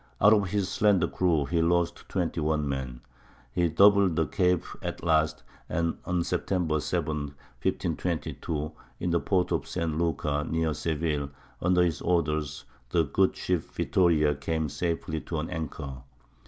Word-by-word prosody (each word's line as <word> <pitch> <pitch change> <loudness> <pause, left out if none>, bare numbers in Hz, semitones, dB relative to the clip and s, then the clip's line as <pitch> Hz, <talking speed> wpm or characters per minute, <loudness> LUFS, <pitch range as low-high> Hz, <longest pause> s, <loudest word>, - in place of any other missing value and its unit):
Out 105 +3 +7
of 100 -3 +2
his 100 -1 0
slender 100 -1 +3
crew 85 -6 +1
he 85 +3 +1
lost 85 +1 0
21 80 -4 0
men. 65 -3 -4 0.5
He 85 +6 +1
doubled 100 +1 +5
the 80 - +2
Cape 90 0 +1 0.2
at - - -5
last; 80 -2 +2 0.3
and 85 0 0
on 90 -1 0
September 85 -4 0
7, - - -1 0.6
1522, 80 -2 -2 0.3
in 90 - -1
the 85 - +3
port 90 -1 +1
of - - 0
St. 80 -2 -2
Lucar, 75 -3 0
near 80 -1 0
Seville, 75 -3 -1 0.3
under 90 0 +4
his 85 -3 0
orders, 75 -4 0 0.2
the 85 +4 +3
good 95 +7 +2
ship 90 -3 0
Vittoria 80 -5 +2
came 80 +1 -2
safely 80 +1 -2
to 80 - -4
an 80 - -4
anchor. 75 -5 -5
80 Hz, 145 wpm, -28 LUFS, 75-90 Hz, 0.6 s, Out